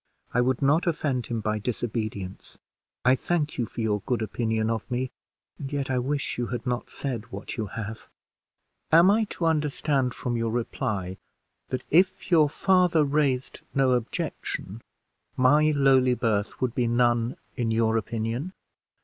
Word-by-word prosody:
I 125 Hz, -, +3 dB
would 130 Hz, +2 st, +1 dB
not 155 Hz, +6 st, +3 dB
offend 140 Hz, -6 st, 0 dB
him 115 Hz, -2 st, -2 dB
by 110 Hz, 0 st, -1 dB
disobedience. 110 Hz, -4 st, -4 dB, 0.5 s
I 130 Hz, -, +6 dB
thank 150 Hz, +1 st, -1 dB
you 120 Hz, -, 0 dB
for 115 Hz, -, -6 dB
your 105 Hz, -2 st, 0 dB
good 120 Hz, -4 st, 0 dB
opinion 110 Hz, 0 st, -1 dB
of 115 Hz, +3 st, -3 dB
me, 125 Hz, +1 st, -2 dB, 0.5 s
and 135 Hz, 0 st, -6 dB
yet 140 Hz, -2 st, -2 dB
I 130 Hz, -, +1 dB
wish 140 Hz, +1 st, -2 dB
you 120 Hz, -, -1 dB
had 120 Hz, -, -4 dB
not 125 Hz, -1 st, -2 dB
said 120 Hz, -4 st, -5 dB
what -, -, -6 dB
you 110 Hz, -3 st, -3 dB
have." 110 Hz, +2 st, -6 dB, 0.8 s
"Am 170 Hz, +4 st, +7 dB
I 220 Hz, +1 st, +3 dB
to 180 Hz, -, -4 dB
understand 150 Hz, -4 st, +1 dB
from 120 Hz, -1 st, -3 dB
your 115 Hz, -1 st, 0 dB
reply, 105 Hz, -5 st, -2 dB, 0.5 s
that, 130 Hz, -1 st, -3 dB
if 185 Hz, +3 st, +3 dB
your 155 Hz, -4 st, +6 dB
father 180 Hz, -1 st, +3 dB
raised 140 Hz, -3 st, 0 dB
no 135 Hz, -1 st, +3 dB
objection, 115 Hz, -3 st, -3 dB, 0.6 s
my 150 Hz, +4 st, +5 dB
lowly 135 Hz, -3 st, +4 dB
birth 110 Hz, -4 st, -1 dB
would 125 Hz, -2 st, 0 dB
be 125 Hz, -2 st, +1 dB
none 120 Hz, 0 st, +2 dB, 0.2 s
in 120 Hz, -2 st, -1 dB
your 110 Hz, 0 st, +2 dB
opinion?" 115 Hz, -, -2 dB
125 Hz, 160 wpm, -26 LUFS, 115-145 Hz, 0.8 s, Am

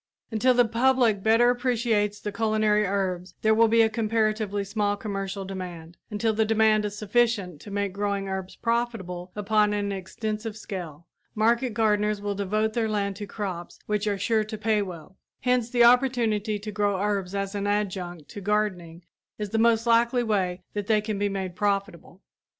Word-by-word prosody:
Until 245 Hz, +3 st, +3 dB
the 245 Hz, 0 st, +5 dB
public 235 Hz, -2 st, +2 dB
better 230 Hz, +3 st, +4 dB
appreciates 235 Hz, -4 st, 0 dB
the 210 Hz, -, -4 dB
culinary 215 Hz, -1 st, +2 dB
herbs 185 Hz, -2 st, -2 dB
there 220 Hz, 0 st, +5 dB
will 225 Hz, +1 st, +5 dB
be 225 Hz, +1 st, +5 dB
a -, -, +4 dB
comparatively 215 Hz, -2 st, 0 dB
small 205 Hz, 0 st, -1 dB
commercial 195 Hz, -1 st, -4 dB
demand; 175 Hz, -3 st, -7 dB
until 220 Hz, +1 st, 0 dB
the 220 Hz, +1 st, +2 dB
demand 215 Hz, -1 st, +3 dB
is 205 Hz, 0 st, -4 dB
sufficient 210 Hz, -6 st, 0 dB
to -, -, -10 dB
make 200 Hz, -1 st, -2 dB
growing 200 Hz, 0 st, -2 dB
herbs 190 Hz, -1 st, -5 dB
profitable 225 Hz, -7 st, -2 dB
upon 210 Hz, 0 st, +2 dB
an 205 Hz, -1 st, -1 dB
extensive 215 Hz, +3 st, -4 dB
scale, 175 Hz, -7 st, -7 dB, 0.3 s
market 230 Hz, +2 st, +2 dB
gardeners 210 Hz, -1 st, +2 dB
will 205 Hz, 0 st, -2 dB
devote 215 Hz, +2 st, -1 dB
their 225 Hz, -1 st, 0 dB
land 200 Hz, -2 st, -1 dB
to 205 Hz, -1 st, -6 dB
crops 185 Hz, -5 st, -5 dB
which 210 Hz, 0 st, -1 dB
are 205 Hz, -1 st, 0 dB
sure 215 Hz, +2 st, +1 dB
to 215 Hz, +1 st, -6 dB
pay 215 Hz, -1 st, +1 dB
well; 185 Hz, -1 st, -8 dB, 0.2 s
hence 250 Hz, -2 st, +1 dB
the 240 Hz, -1 st, +4 dB
opportunity 235 Hz, -4 st, +3 dB
to 210 Hz, +1 st, -7 dB
grow 205 Hz, -2 st, 0 dB
herbs 200 Hz, -2 st, -1 dB
as 195 Hz, 0 st, -2 dB
an 205 Hz, 0 st, -2 dB
adjunct 185 Hz, -6 st, -2 dB
to 205 Hz, -, -9 dB
gardening 185 Hz, -5 st, -1 dB, 0.3 s
is 210 Hz, -2 st, -4 dB
the 225 Hz, -, +1 dB
most 230 Hz, 0 st, +3 dB
likely 235 Hz, +1 st, +3 dB
way 185 Hz, -5 st, -1 dB
that 205 Hz, -1 st, -3 dB
they 220 Hz, -1 st, +4 dB
can 210 Hz, -1 st, -3 dB
be 205 Hz, 0 st, +1 dB
made 190 Hz, -2 st, -4 dB
profitable. 195 Hz, -2 st, -2 dB
210 Hz, 175 wpm, -26 LUFS, 195-225 Hz, 0.3 s, the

